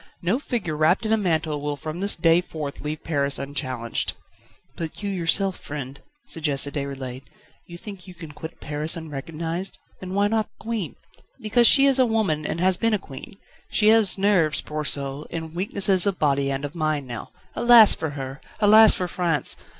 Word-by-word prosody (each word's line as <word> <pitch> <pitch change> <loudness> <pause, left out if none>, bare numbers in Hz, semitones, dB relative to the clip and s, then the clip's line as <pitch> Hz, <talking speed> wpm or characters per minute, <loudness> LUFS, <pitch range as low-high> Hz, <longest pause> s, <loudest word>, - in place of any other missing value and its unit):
No 190 +9 +1
figure 230 - -3
wrapped 160 +8 +2
in 220 - +1
a - - +6
mantle 160 -7 -1
will 145 0 -2
from 155 +4 -7
this 200 +2 +2
day 165 +1 +3
forth 155 -5 -7
leave 150 +1 -5
Paris 140 -3 0
unchallenged." 130 -4 -3 0.6
"But 165 +4 -7
you 200 - -2
yourself, 190 +1 +1
friend?" 140 -2 -7 0.2
suggested 145 -3 -1
Déroulède. 135 -3 -5 0.5
"You 170 - -10
think 195 -2 -10
you 180 - -11
can 165 -3 -10
quit 160 +2 -10
Paris 150 +3 0
unrecognised 165 +4 -5 0.2
then 185 0 -6
why 200 +1 +3
not 220 0 0
the - - -21
Queen?" 225 -7 -3 0.4
"Because 235 +1 +4
she 275 -1 +7
is 275 -1 +3
a 255 - +4
woman, 195 -10 0
and - - -3
has 185 0 +4
been 225 -1 +1
a - - 0
queen. 140 0 -11 0.3
She 210 -1 +3
has 220 -4 +4
nerves, 190 -6 +2
poor 150 0 -5
soul, 140 0 -2
and 160 -1 -6
weaknesses 190 +1 +2
of 195 -2 0
body 140 -2 +1
and 135 +1 -3
of 145 - -7
mind 155 -4 -1
now. 120 -3 -7 0.3
Alas 235 -3 +7
for 160 - -3
her! 135 0 -7 0.2
Alas 215 +1 +7
for 180 - -2
France! 170 -3 +1
165 Hz, 185 wpm, -23 LUFS, 145-200 Hz, 0.6 s, she